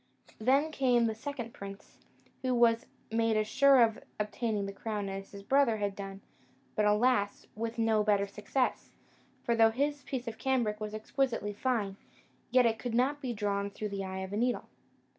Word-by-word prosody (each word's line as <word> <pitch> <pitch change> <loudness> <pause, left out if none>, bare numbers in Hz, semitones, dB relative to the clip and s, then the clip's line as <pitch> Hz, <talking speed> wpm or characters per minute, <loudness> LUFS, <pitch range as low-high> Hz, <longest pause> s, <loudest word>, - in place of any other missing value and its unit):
Then 275 +7 +3
came 250 -5 +3
the 225 - 0
second 235 0 -6
prince, 200 0 -10 0.4
who 255 -2 +1 0.5
made 225 -1 +2
as 215 0 +1
sure 270 +1 +6
of 225 -1 +1 0.2
obtaining 210 -1 -1
the 195 - -5
crown 205 -1 -3
as 195 0 -6
his 200 -1 -10
brother 265 -1 +3
had 205 -2 -2
done, 195 -1 -7 0.5
but, 210 - +2
alas! 210 -1 +2
with 230 +2 -4
no 225 -2 +3
better 205 -1 +3
success; 210 +6 -2 0.5
for 235 - +1
though 225 -1 +6
his 285 +5 -1
piece 255 -2 -5
of 225 -1 -5
cambric 240 -6 0
was 215 0 -4
exquisitely 230 -1 -1
fine, 205 -4 -1 0.5
yet 255 0 +5
it 225 -1 +1
could 240 -2 -3
not 275 +4 +2
be 255 -3 -2
drawn 200 -2 -1
through 210 +1 -5
the 195 -1 -3
eye 190 0 -4
of 190 0 -6
the 205 - -2
needle. 245 +2 0
225 Hz, 180 wpm, -31 LUFS, 205-250 Hz, 0.5 s, sure